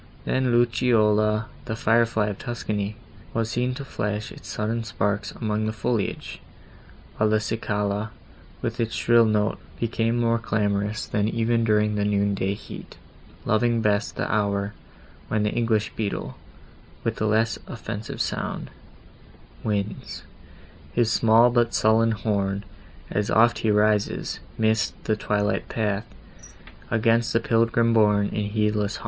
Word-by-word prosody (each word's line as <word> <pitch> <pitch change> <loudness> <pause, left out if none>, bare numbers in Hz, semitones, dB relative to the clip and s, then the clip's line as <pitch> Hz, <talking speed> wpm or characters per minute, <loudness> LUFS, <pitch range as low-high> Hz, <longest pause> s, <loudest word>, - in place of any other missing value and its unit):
Then 130 0 +1
the - - +2
lucciola, 110 -2 +3 0.2
the 110 - -3
fire 115 +1 +3
fly 110 -2 0
of 100 - -6
Tuscany, 105 -3 -3 0.4
was 115 0 0
seen 125 +2 0
to 140 0 -6
flash 105 -4 -3
its - - -12
sudden 115 +2 -2
sparks 105 -1 -1
among 110 -1 -1
the - - 0
foliage, 110 0 -2 0.8
while 110 0 +3
the 110 0 +3
cicala, 105 -1 -2 0.5
with - - -3
its 115 -1 -1
shrill 115 -1 +4
note, 105 -1 +1 0.2
became 115 0 0
more 115 -1 +2
clamorous 105 -1 -1
than 105 +1 0
even 115 0 +1
during 105 -1 +2
the 105 -1 0
noon 100 0 +1
day 100 0 -1
heat, - - -10 0.5
loving 115 +2 +2
best 105 -1 +1
the - - -2
hour 100 -1 0 0.5
when 110 -1 0
the 105 - +1
English 110 -2 0
beetle, 105 -3 -3 0.7
with - - -2
less 110 +1 +2
offensive 105 +2 -6
sound, - - -3 0.9
winds 105 -1 -3 0.7
His 115 -2 +2
small 115 +1 +5
but 120 -1 +2
sullen 110 +1 +3
horn, 100 -1 -1 0.5
As 105 0 0
oft 120 +2 +4
he 110 - 0
rises 105 0 +1 0.2
'midst 110 +1 +1
the 110 - +1
twilight 105 -1 -1
path, 105 -1 -1 0.8
Against 115 +1 +2
the 115 - +4
pilgrim 115 0 +2
borne 105 -2 +4
in 105 -1 -2
heedless 105 -1 0
hum. - - -7
110 Hz, 140 wpm, -25 LUFS, 105-115 Hz, 0.9 s, small